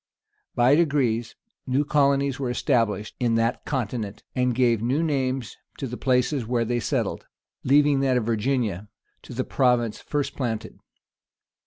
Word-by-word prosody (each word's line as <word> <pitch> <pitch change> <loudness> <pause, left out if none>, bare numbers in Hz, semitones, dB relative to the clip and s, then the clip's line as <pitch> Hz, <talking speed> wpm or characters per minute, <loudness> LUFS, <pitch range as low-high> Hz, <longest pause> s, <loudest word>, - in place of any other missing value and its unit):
[] 420 0 -45
By 125 +2 +4
degrees, 140 -8 +1 0.3
new 135 +3 +1
colonies 140 -2 +2
were 130 -3 -2
established 115 -5 0
in 120 -2 +1
that 115 +1 0
continent, 115 -6 -3
and 125 -2 +1
gave 120 -3 +2
new 130 +7 +1
names 130 -6 -1 0.2
to - - -4
the 125 -1 -5
places 125 +1 +1
where 120 +1 0
they 120 +1 0
settled, - - -2 0.4
leaving 145 +1 +4
that 135 -2 +2
of 120 - -1
Virginia 110 -4 -1 0.3
to - - -10
the - - -1
province 120 -4 +1
first 145 -1 -3
planted. 115 -5 -4
125 Hz, 150 wpm, -25 LUFS, 115-140 Hz, 0.4 s, By